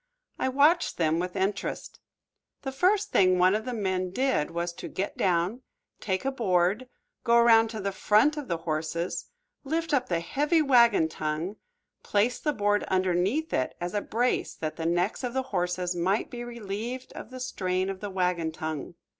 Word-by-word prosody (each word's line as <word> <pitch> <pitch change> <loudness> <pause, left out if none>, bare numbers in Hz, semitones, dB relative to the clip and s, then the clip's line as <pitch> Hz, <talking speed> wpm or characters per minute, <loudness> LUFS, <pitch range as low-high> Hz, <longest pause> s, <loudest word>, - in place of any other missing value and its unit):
I - - +1
watched 295 +6 +3
them 160 -1 +2
with 180 0 -3
interest. 195 +2 -2 0.6
The 270 - -3
first 390 +9 +2
thing 185 -1 +4
one 180 +1 +5
of 215 +1 -1
the 250 - -3
men 185 -3 -1
did 190 - 0
was 170 +1 -3
to - - -8
get 195 - -4
down, 185 +6 0 0.4
take 190 +3 -2
a 270 - +1
board, 205 0 +1 0.3
go 235 -1 +3
around 230 -1 +6
to 220 -1 -5
the 200 0 -2
front 215 +9 +3
of 295 -3 -5
the 170 - -1
horses, 165 +1 -3 0.4
lift 320 +3 -2
up 260 -3 +1
the 170 -2 +1
heavy 295 - +1
wagon 235 - +5
tongue, 160 +6 -3 0.4
place 215 +4 +1
the 300 - 0
board 205 -5 +1
underneath 190 - 0
it 130 - 0
as 175 +1 -4
a 205 - 0
brace 245 +5 -1
that 155 -1 -4
the 165 -1 -2
necks 175 +8 0
of 250 0 -3
the 265 - +1
horses 180 0 -1
might 185 +5 0
be 240 0 -5
relieved 235 +2 -6
of - - -9
the 255 0 -8
strain 185 -7 -1
of 195 -1 -4
the 205 - -5
wagon 180 -3 0
tongue. 160 0 -5
200 Hz, 180 wpm, -27 LUFS, 175-250 Hz, 0.6 s, around